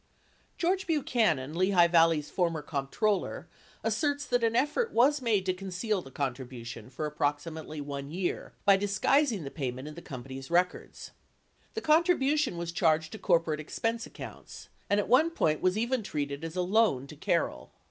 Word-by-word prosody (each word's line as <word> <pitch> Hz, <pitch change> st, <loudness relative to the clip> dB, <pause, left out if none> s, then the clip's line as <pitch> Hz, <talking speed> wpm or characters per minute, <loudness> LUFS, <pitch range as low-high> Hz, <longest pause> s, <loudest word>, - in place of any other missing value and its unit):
George 370 Hz, +2 st, 0 dB
Buchanan, 220 Hz, -, +1 dB
Lehigh 185 Hz, 0 st, +4 dB
Valley's 165 Hz, -3 st, +3 dB
former 165 Hz, -4 st, 0 dB
comptroller, 155 Hz, +9 st, -1 dB, 0.4 s
asserts 290 Hz, -1 st, 0 dB
that 245 Hz, -3 st, +1 dB
an 230 Hz, 0 st, +2 dB
effort 300 Hz, -, +1 dB
was 275 Hz, +4 st, +4 dB
made 215 Hz, -6 st, +1 dB
to 185 Hz, -, +1 dB
conceal 190 Hz, +2 st, -2 dB
the 135 Hz, -, -12 dB
contribution 125 Hz, -4 st, -5 dB
for 145 Hz, +4 st, -4 dB
approximately 150 Hz, +1 st, -3 dB
1 140 Hz, -1 st, -5 dB
year 180 Hz, +3 st, -3 dB
by 200 Hz, -1 st, +7 dB
disguising 205 Hz, -, +2 dB
the 140 Hz, -, -6 dB
payment 130 Hz, -1 st, -4 dB
in 150 Hz, -, -7 dB
the 170 Hz, -, -9 dB
company's 130 Hz, -1 st, -8 dB
records. 180 Hz, +1 st, -1 dB, 0.6 s
The 445 Hz, -, -2 dB
con 315 Hz, -1 st, +5 dB
tribution 295 Hz, -, +1 dB
was 170 Hz, 0 st, -3 dB
charged 160 Hz, -2 st, +2 dB
to 220 Hz, -, -8 dB
corporate 165 Hz, -4 st, +2 dB
expense 225 Hz, +9 st, -2 dB
accounts, -, -, -10 dB, 0.2 s
and 205 Hz, -, +3 dB
at 205 Hz, -, -1 dB
one 275 Hz, +8 st, +5 dB
point 155 Hz, -, 0 dB
was 185 Hz, +2 st, +2 dB
even 240 Hz, +2 st, 0 dB
treated 145 Hz, -5 st, -4 dB
as 165 Hz, +1 st, -5 dB
a 180 Hz, -, +1 dB
loan 190 Hz, -, +2 dB
to -, -, -11 dB
Carroll. -, -, -1 dB
180 Hz, 165 wpm, -29 LUFS, 150-230 Hz, 0.6 s, by